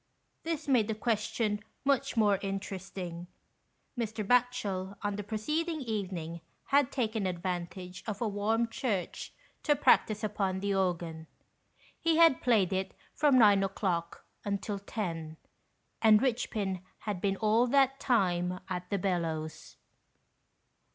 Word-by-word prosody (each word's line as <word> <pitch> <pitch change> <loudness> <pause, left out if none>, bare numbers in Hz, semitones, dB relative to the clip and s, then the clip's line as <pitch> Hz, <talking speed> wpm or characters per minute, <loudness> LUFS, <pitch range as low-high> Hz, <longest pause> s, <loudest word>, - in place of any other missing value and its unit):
This 320 -2 -3
made 245 -6 +3
the 220 - -1
question 215 -1 -1 0.2
much 275 -3 +1
more 205 -3 +4
inter 195 0 -4
esting. 180 -2 -7 0.7
Mr. 225 -3 -3
Batchel, 205 -5 +1
on 205 -1 -1
the 205 - -3
preceding 305 - -2
evening, 185 - -4 0.3
had 280 -2 +4
taken 220 -6 -1
advantage 180 0 -4
of 210 -2 -3
a 235 - 0
warmed 220 +3 0
church 205 -10 -2 0.3
to 295 - +3
practise 215 -6 +3
upon 195 -3 -1
the 200 +1 0
organ. 170 -4 -1 0.7
He 330 -1 +2
had 330 -6 +6
played 210 -7 +3
it 190 0 -2 0.2
from 290 -4 +4
nine 205 -4 +6
o'clock 180 -3 -2 0.2
until 200 0 -2
ten, 165 -7 -4 0.6
and 215 -2 +7
Richpin 215 -7 -1 0.2
had 205 -4 -3
been 195 -1 0
all 220 +4 +3
that 270 +1 +3
time 180 -8 +1
at 180 -1 -4
the 200 - 0
bellows. 165 -4 -3
205 Hz, 130 wpm, -31 LUFS, 185-230 Hz, 0.7 s, and